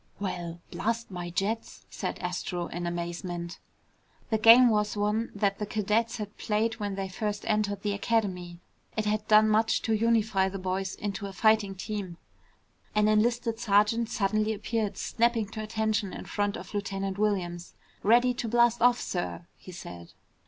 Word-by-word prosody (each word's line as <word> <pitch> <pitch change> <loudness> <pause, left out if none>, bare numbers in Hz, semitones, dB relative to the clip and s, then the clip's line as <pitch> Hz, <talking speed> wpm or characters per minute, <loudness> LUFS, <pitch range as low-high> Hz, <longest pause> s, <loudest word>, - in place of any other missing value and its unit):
"Well, 175 -4 -4
blast 230 0 -2
my 175 -1 -5
jets!" 200 +6 -3
said - - -4
Astro 180 0 -3
in 175 0 -4
amazement. 170 0 -4 0.7
The 220 - +2
game 235 +3 +8
was 210 -1 +1
one 210 +3 0
that 200 -1 0
the 210 - -3
cadets 215 +2 0
had 210 -2 -7
played 225 +2 0
when 205 -2 -2
they 195 0 -3
first 205 +2 -3
entered 210 -2 0
the 205 - 0
Academy. 190 -5 -1 0.4
It 215 - 0
had 210 0 -1
done 215 0 +6
much 220 +1 +2
to 225 - +1
unify 220 -3 +2
the 195 - -5
boys 190 0 -2
into 200 0 -4
a 195 - -8
fighting 215 -1 +3
team. 190 -3 -5 0.8
An 210 0 +4
enlisted 230 +1 +2
sergeant 220 +1 +2
suddenly 215 0 +1
appeared, 215 0 -2
snapping 235 -2 +1
to 215 - -6
attention 215 -2 -1
in - - -7
front 205 -1 -1
of - - -10
Lieutenant 195 -1 -3
Williams. 180 -5 -1 0.3
"Ready 245 +4 +4
to 240 -1 -4
blast 240 +1 +3
off, 245 0 +5
sir," 175 -1 -4
he 185 - -12
said. 85 - -10
210 Hz, 160 wpm, -28 LUFS, 190-220 Hz, 0.8 s, game